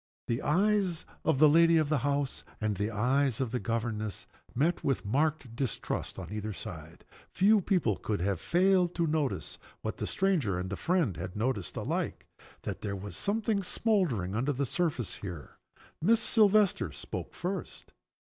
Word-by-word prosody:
The 120 +3 -1
eyes 190 0 +1 0.2
of 160 -3 +2
the 155 +3 +7
lady 165 +2 +6
of 155 -2 +2
the 155 - +2
house 140 +1 -1 0.2
and 110 -2 0
the 105 +3 -1
eyes 125 +4 +1
of 130 -4 -1
the 125 - -1
governess 110 -4 -3 0.3
met, 160 +7 +1
with 135 -6 0
marked 140 +1 0
distrust 125 -3 -3
on - - -7
either 105 0 -3
side. - - -9 0.2
Few 205 +3 +4
people 170 - +1
could 105 -2 -2
have 95 -1 -1
failed 180 0 +3
to 155 -4 +1
see - - -10 0.3
what - - -3
the - - -3
stranger 165 - +1
and 90 +1 -4
the - - -1
friend 165 - +1
had 90 +4 -6
noticed 110 -3 -2
alike - - -2 0.4
that - - -4
there 100 -2 -3
was 100 +1 -7
something 215 0 0
smoldering 180 - 0
under 130 +7 0
the 140 +2 -1
surface 145 - -1
here. 85 -7 -8 0.4
Miss 220 +7 +4
Silvester 210 - +4
spoke - - -6
first. 180 +1 -5
140 Hz, 165 wpm, -30 LUFS, 110-180 Hz, 0.4 s, the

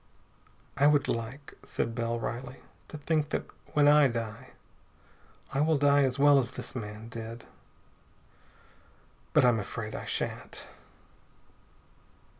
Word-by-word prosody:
"I 140 +1 +5
would 145 -1 +3
like," 120 +5 -4
said 115 - -3
Bell 115 0 -2
wryly, 125 +3 -5 0.3
"to 155 - -8
think 150 0 0
that, - - -2 0.3
when 145 -1 +5
I 150 -1 +7
die, 115 +1 -5 1.0
I 135 - +1
will 155 0 +3
die 145 0 +4
as 130 0 -1
well 145 0 +6
as 120 -3 -1
this - - -7
man 105 -1 -6
did. 115 0 -8 1.9
But - - +5
I'm 120 -2 +4
afraid 105 +1 -5
I - - -5
shan't." - - -4
125 Hz, 125 wpm, -29 LUFS, 115-145 Hz, 1.9 s, I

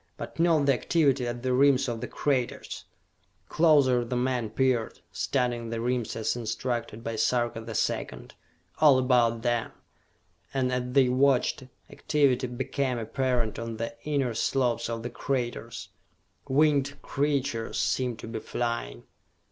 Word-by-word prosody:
But - - -8
note 165 -4 +3
the 140 - +5
activity 135 -2 +1
at 120 0 -5
the 130 -1 +1
rims 135 0 +4
of 115 -2 -3
the - - -4
craters!" 130 -4 -2 0.6
Closer 145 -7 +4
the 120 +1 -4
men 125 -2 0
peered, 120 0 0
studying 120 -3 -1
the 115 0 -3
rims 120 0 -1
as 110 +1 -1
instructed 115 -1 -3
by 115 -1 -4
Sarka 115 +1 0
the 110 0 -7
Second. - - -2 0.5
All 145 -4 +7
about 120 -3 +2
them 120 -2 0 0.8
and 130 -1 +1
as 125 0 -2
they 135 -2 +5
watched, 130 0 +2 0.3
activity 135 -4 +1
became 130 +1 -2
apparent 120 -1 -1
on 115 -1 -5
the 115 0 -4
inner 140 -5 0
slopes 120 0 0
of 115 -1 -4
the 120 - -5
craters 120 -3 -3 0.6
winged 140 0 +2
creatures 140 -5 -1
seemed 125 -3 0
to - - -9
be 115 0 -4
flying. 115 - -3
125 Hz, 140 wpm, -27 LUFS, 115-135 Hz, 0.8 s, All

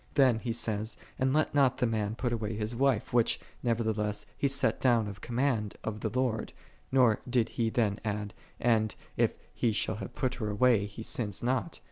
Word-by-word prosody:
Then 130 -5 +5
he 120 0 -3
saith, 110 -1 -1 0.2
"And 130 0 +2
let 155 +3 +1
not 135 -3 +4
the - - +2
man 110 -2 -1
put 120 0 -1
away 110 -2 -2
his 110 +2 -2
wife," 130 -3 +1
which, 120 -2 +3 0.2
nevertheless, 110 -3 0
he 140 - +1
set 135 0 +1
down 120 -4 +3
of 100 -2 -8
command 120 -4 0
of 105 -1 -4
Ihe 110 - -1
Lord: 125 -4 0 0.4
nor 125 -5 +4
did 120 -2 +2
he 115 -1 0
ihen 110 -3 +1
add, 105 -1 -3 0.3
And, 110 -3 +2 0.2
if - - +2 0.2
he 115 - +1
shall 105 0 0
have 120 - -7
pul 130 - 0
her 110 -2 -2
away, 105 -1 +3
he 105 +2 -8
sinneth 105 -3 0
not. 130 +7 -1
115 Hz, 190 wpm, -30 LUFS, 105-125 Hz, 0.4 s, Then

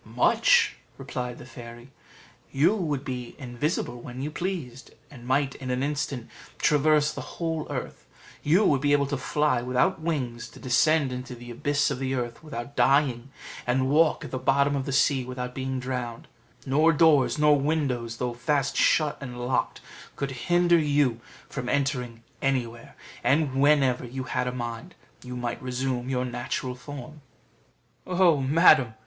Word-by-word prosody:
"Much," 485 -1 +3 0.2
replied 125 -2 -5
the - - -11
fairy; 120 0 -11 0.6
"you 155 +9 +3
would 150 -8 -2
be 125 -3 -5
invisible 125 -1 -3
when 125 +1 -8
you 145 +3 -3
pleased, 155 -8 -5 0.2
and 120 -3 -12
might 135 +1 +1
in 130 - -7
an 125 +1 0
instant 140 -4 -3 0.3
traverse 150 0 +3
the - - -8
whole 165 -2 -2
earth; - - -6 0.3
you 175 +8 +3
would 140 -3 +3
be 145 0 +2
able 140 -1 +3
to 140 +1 -2
fly 140 -1 0
without 130 +9 +1
wings, 125 -8 -3
to - - -15
descend 140 +3 +2
into 125 0 -6
the 120 0 -10
abyss 145 +4 0
of 135 - -3
the 135 0 -1
earth 120 0 -4
without 140 -2 -7
dying, 130 0 +2 0.4
and 130 +2 +1
walk 155 +1 +3
at - - -9
the 130 - -3
bottom 140 +2 +2
of 135 -1 -3
the - - -2
sea 140 -1 +2
without 125 0 -5
being 130 0 -3
drowned; 125 -2 -5 0.4
nor 150 +5 +4
doors, 155 -4 +4
nor 150 0 +5
windows, 135 -6 -1
though 125 0 -2
fast 140 +2 0
shut 155 -2 +2
and 125 -3 -7
locked, 130 - -1 0.3
could 140 -1 -3
hinder 175 +7 +3
you 145 -6 +2 0.3
from 125 - -5
entering 125 -5 -1 0.2
anywhere; 120 -4 -2 0.3
and 145 -1 +2
whenever 135 -2 +3
you 130 +2 -5
had 125 0 -2
a - - 0
mind, 120 +7 -6 0.3
you 125 0 -7
might 120 -1 -4
resume 130 0 -2
your 125 -1 0
natural 125 +1 -3
form." 145 +3 -10 0.9
"Oh, 180 -3 +4
madam!" 135 -4 +5
135 Hz, 160 wpm, -26 LUFS, 125-150 Hz, 0.9 s, nor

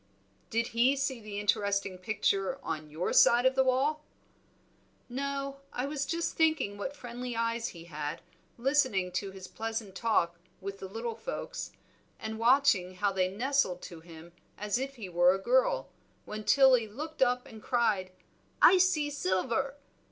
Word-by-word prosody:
"Did 230 +1 0
he 245 +4 +3
see 270 -2 -1
the 210 -1 -5
interesting 200 -2 0
picture 200 +3 0
on 155 -1 -4
your 160 +4 -2
side 240 +1 +6
of 260 - +5
the 265 0 +3
wall?" 275 +4 +1 1.0
"No, 275 +2 -3
I 250 - -2
was 280 -1 -2
just 335 0 -2
thinking 315 -11 +2
what 235 +8 -5
friendly 245 -2 -6
eyes 230 0 -1
he 170 -2 -9
had, 150 -3 -5 0.3
listening 240 -8 +2
to 190 +2 -2
his 190 -1 -10
pleasant 225 -3 -5
talk 180 -5 +1 0.2
with 195 0 -6
the 190 - -6
little 225 +4 -4
folks, - - -5 0.5
and 220 0 -5
watching 230 -7 +3
how 200 +2 +1
they 185 -1 +1
nestled 225 -3 0
to 170 - -8
him 165 0 -13 0.3
as 210 +2 -1
if 275 +1 -4
he 220 -6 -7
were 175 +1 +4
a - - -1
girl, - - +2 0.4
when 215 0 -6
Tilly 260 -4 +5
looked 305 +9 -7
up 250 -1 +3
and 220 -1 -12
cried, 210 -7 +1 0.5
'I 370 - +7
see 310 -5 +2
Silver!' 260 +3 -1
230 Hz, 160 wpm, -30 LUFS, 190-270 Hz, 1.0 s, I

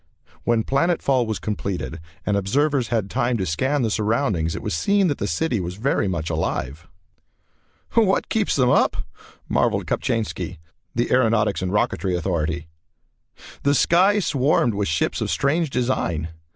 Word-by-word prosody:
When 115 -2 +2
planet 170 +8 +1
fall 130 -4 +1
was 110 - -2
completed 90 - -4 0.3
and 105 - +1
observers 130 +6 +1
had 110 -5 0
time 120 +4 0
to 95 - -1
scan 130 - 0
the 110 - 0
surroundings 105 - 0
it - - -6
was - - -2
seen 195 - +2
that 145 - -2
the - - -1
city 160 -9 0
was 90 0 -4
very 110 -1 0
much 85 -3 -2
alive. 80 -1 -3 1.1
"What 210 -4 +3
keeps 220 -2 0
them 125 -3 +3
up!" - - +3 0.5
marvelled - - +1
Kopchainski, 115 -2 -2 0.4
the 120 +1 0
aeronautics 110 -5 +2
and 90 0 -2
rocketry 95 -2 0
authority. 85 -2 -2 0.9
The 140 +1 +2
sky 185 +9 +4
swarmed 140 - +2
with 100 0 -1
ships 80 0 0
of - - -1
strange 155 +3 +1
design. 120 - -1
115 Hz, 150 wpm, -22 LUFS, 90-140 Hz, 1.1 s, sky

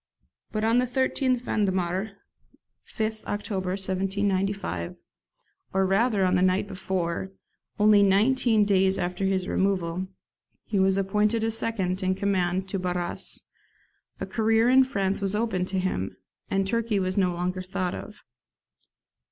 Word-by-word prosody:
But 215 0 -2
on 225 +2 +3
the 250 - +1
13th 260 0 +1
Vendemiaire 190 -1 -1 0.7
(5th 220 0 -3
October 200 -3 -3
1795), 195 - -1 0.8
or 190 0 +2
rather 200 +1 +2
on 185 - +2
the 180 - +3
night 185 +2 +2
before, 190 -1 -3 0.5
only 210 -1 +6
nineteen 215 +2 +3
days 195 -1 +3
after 180 +2 -2
his 190 -1 0
removal, 185 -2 0 0.6
he 205 -3 -1
was 190 0 +3
appointed 210 +3 +1
second 195 -5 -1
in 185 0 +1
command 190 -1 0
to 195 - -2
Barras, 180 -1 -3 0.8
a - - -3
career 225 +1 +2
in 265 +1 +7
France 200 -6 -1
was 195 +1 0
opened 210 -5 0
to 190 - -2
him, 180 - -2 0.3
and 195 0 +1
Turkey 230 +1 0
was 185 0 -1
no 185 -3 +2
longer 180 +1 -2
thought 185 -1 -3
of. 210 - -9
195 Hz, 135 wpm, -26 LUFS, 185-215 Hz, 0.8 s, in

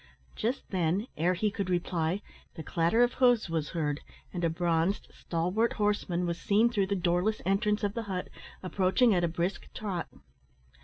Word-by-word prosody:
Just 240 +5 -2
then, 185 +2 +1
ere 175 +4 +2
he 210 +3 0
could 195 -2 -3
reply, 175 +1 0 0.3
the 160 - -6
clatter 170 +10 +2
of 245 - +2
hoofs 245 -8 +3
was 160 -2 -1
heard, 150 -2 0 0.3
and 175 - -3
a 165 - +3
bronzed, 170 +3 0
stalwart 180 +8 0
horseman 205 -4 0
was 170 0 -3
seen 220 +4 +3
through 200 -5 +1
the 200 - 0
doorless 180 +4 +1
entrance 210 +2 +1
of 200 -1 0
the 230 - -2
hut, 185 -1 -3 0.3
approaching 190 +5 +3
at 175 -2 +2
a - - +3
brisk 170 +3 -3
trot. 195 -6 -3
185 Hz, 170 wpm, -30 LUFS, 170-210 Hz, 0.3 s, hoofs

